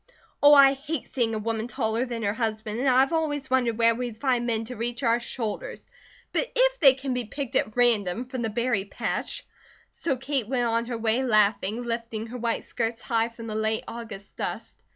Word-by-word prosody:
"Oh, 290 0 +8
I 275 -1 +8
hate 285 +1 -5
seeing 230 -4 -1
a - - -1
woman 225 +1 -2
taller 235 0 -1
than 235 -2 -4
her 200 0 +1
husband 220 -1 -3
and 265 +1 +2
I've 265 +4 +4
always 295 -4 -1
wondered 245 -4 +2
where 230 0 +4
we'd 235 -2 -5
find 245 -3 +1
men 225 -1 0
to 250 +2 -7
reach 240 +2 -4
our 235 0 +3
shoulders. 245 - -4 0.5
But - - -1
if - - +3
they 270 -4 +7
can 270 -1 -3
be 250 -1 -2
picked 275 +3 -5
at 215 +2 +1
random 230 -2 +2
from 255 -1 -5
the 225 - -1
berry 230 -2 0
patch 200 - -3 0.2
" - - -29
So 275 -6 -2
Kate 265 -3 -2
went 250 -2 +1
on 230 0 0
her 240 -2 -3
way 225 +2 +1
laughing, 215 -1 +2
lifting 230 -2 -3
her 240 +2 -7
white 235 0 -1
skirts 230 -1 -2
high 230 0 0
from 230 0 -10
the 220 - -5
late 220 0 0
August 225 -4 -8
dust. - - -4
235 Hz, 210 wpm, -26 LUFS, 225-260 Hz, 0.5 s, Oh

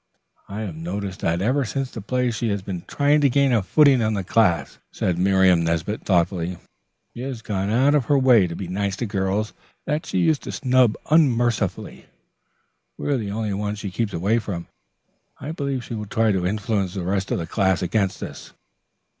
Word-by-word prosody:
"I 100 +2 -5
have 95 -7 -5
noticed 95 +4 -5
that 85 +3 0
ever 135 +6 +2
since 135 +2 -3
the 110 - -7
play 125 +3 0
she 115 0 -2
has 100 -2 -2
been 90 -3 -5
trying 145 +1 +2
to 140 - +4
gain 140 +1 +3
a 115 -3 +3
footing 135 +5 +4
in 110 -1 +1
the 100 - -2
class," 95 -2 +1
said 90 -2 -1
Miriam 95 -2 +4
Nesbit 85 +6 -2
thoughtfully. 90 -1 +1 0.6
"She 120 - -8
has 130 -3 -5
gone 100 -2 -2
out 130 +6 +3
of 145 -5 +2
her 145 - +3
way 125 -8 +5
to 85 - -6
be 95 - -5
nice 100 +2 -2
to 120 - -3
girls 100 +1 -1 0.3
that 150 +2 -2
she - - -2
used 160 -4 +2
to - - -6
snub 125 -4 +3 0.2
unmercifully. 120 -7 +1 0.9
We 145 - -1
are - - +1
the 105 -4 -4
only 105 0 -2
ones 105 +1 -3
she 100 -2 -5
keeps 110 +2 -2
away 100 +7 +1
from. 90 -6 -5 0.7
I 140 +4 -5
believe 140 -5 -3
she - - -7
will 105 -2 -5
try 110 +1 +2
to 90 -2 0
influence 100 -2 -1
the 95 - -3
rest 95 +2 -1
of - - 0
the 85 - -3
class 95 -1 +1
against 95 +1 -1
us." - - -9
105 Hz, 200 wpm, -23 LUFS, 95-125 Hz, 0.9 s, way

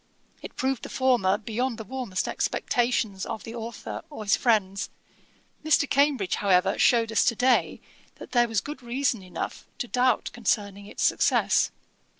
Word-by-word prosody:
It - - -9
proved 265 -1 -1
the - - -7
former, 240 -7 +2
beyond 230 +3 -2
the 220 - -6
warmest 225 -4 -3
expectations 230 -5 0
of 220 - -5
the 225 - -8
authour 230 -1 -6
or 290 -8 -7
his 200 - +3
friends, 200 -5 +1 0.7
Mr. 305 -2 +3
Cambridge, 275 -9 +2
however, 190 -1 +2
shewed 230 -2 +4
us 225 - +3
to 235 - +2
day, 250 +2 +2 0.3
that - - -12
there 240 -2 +3
was 225 -3 0
good 295 -1 -7
reason 245 -1 -1
enough 180 -2 -6
to 245 - -4
doubt 250 0 +1
concerning 205 -3 -1
its - - -4
success. - - +3
230 Hz, 155 wpm, -26 LUFS, 200-255 Hz, 0.7 s, shewed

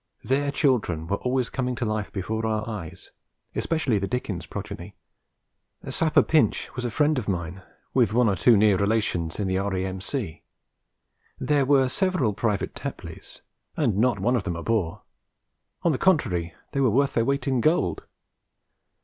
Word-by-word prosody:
Their 140 +2 +1
children 120 - +1
were 100 +4 -1
always 125 +1 -1
coming 125 -1 -1
to 120 - -2
life 110 -2 -2
before 110 +3 -3
our 110 -1 -1
eyes, 105 -8 -7 0.4
especially 150 -10 0
the 100 - -2
Dickens 100 -8 -3
progeny. - - -7 0.9
Sapper 160 -2 +3
Pinch 160 -2 +1
was 125 -1 -3
a - - 0
friend 150 +5 +2
of 110 - -7
mine, 90 -1 -3 0.3
with - - +3
one 120 +1 +3
or 100 - +2
two 115 +4 +5
near 105 -2 +4
relations 100 -5 0
in 100 - 0
the 95 0 0
R.A.M.C. 95 - -3 1.0
There 145 -3 +2
were 135 -2 +4
several 175 - +1
Private 105 -1 -1
Tapleys, 125 - -8 0.4
and 120 -10 +1
not 120 0 +3
one 120 +6 +1
of 115 - 0
them 85 -3 -3
a 85 - -5
bore; 105 -8 -1 0.8
on 170 - +3
the 130 - -1
contrary, 90 - +1 0.2
they 140 - -2
were 130 - +4
worth 135 +5 +2
their 115 - +2
weight 140 0 0
in 130 -3 +2
gold. 105 - +1
110 Hz, 165 wpm, -25 LUFS, 95-135 Hz, 1.0 s, two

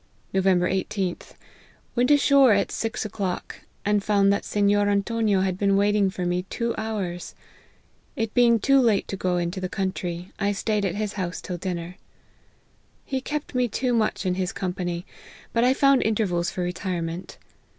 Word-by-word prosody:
"Nov. 190 0 +1
18th. 185 0 0 0.6
Went 245 +1 +2
ashore 280 -4 +6
at 200 -1 +1
six 225 -1 -3
o'clock, 195 -4 -4 0.3
and 205 -1 +2
found 200 -1 +3
that 200 - -1
Sennor 205 0 +2
Antonio 205 0 +1
had 185 -1 -1
been 200 -1 +3
waiting 205 0 +3
for 185 -2 -4
me 175 +1 0
two 235 -1 -1
hours. 200 -6 -4 0.8
It 225 -1 -2
being 235 -1 +5
too 275 +5 +4
late 220 -5 +2
to - - -2
go 180 -2 0
into 175 +2 -2
the 185 - -3
country, 180 -2 -3
I 200 -1 +1
staid 210 0 0
at 180 -1 -1
his 210 0 -2
house 180 -3 -3
till 180 - -5
dinner. 180 0 -5 1.1
He 265 -1 -2
kept 295 +2 -4
me 250 -1 +2
too 245 +3 -1
much 215 -3 0
in 185 - +1
his 185 0 -2
company, 180 -1 -3 0.5
but 230 - +2
1 255 +2 +4
found 275 -1 +4
intervals 195 -6 0
for 180 - -3
re 175 0 -2
tirement. 175 -1 -4
200 Hz, 170 wpm, -25 LUFS, 180-220 Hz, 1.1 s, ashore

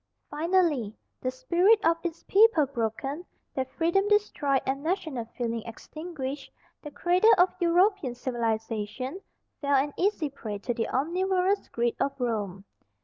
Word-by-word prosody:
Finally, 305 - +1 0.3
the 255 - 0
spirit 345 - +3
of 330 +1 +5
its 340 -2 -4
people 405 -7 +5
broken, 270 +5 -3 0.3
their 265 - -1
freedom 340 +9 +1
destroyed, 365 -10 +2
and 270 +1 -1
national 315 - -2
feeling 230 -2 -2
extinguished, 285 +2 -7 0.3
the 295 - -7
cradle 355 +8 +3
of 360 +1 +4
European 350 - +2
civilization 235 - -3 0.4
fell 285 -1 +2
an 280 +2 +1
easy 370 -5 +1
prey 215 -6 -6
to 225 +4 -3
the 230 -1 -2
omnivorous 370 +6 +1
greed 235 0 -1
of 275 0 -1
Rome. 205 -6 -2
285 Hz, 135 wpm, -27 LUFS, 240-355 Hz, 0.4 s, of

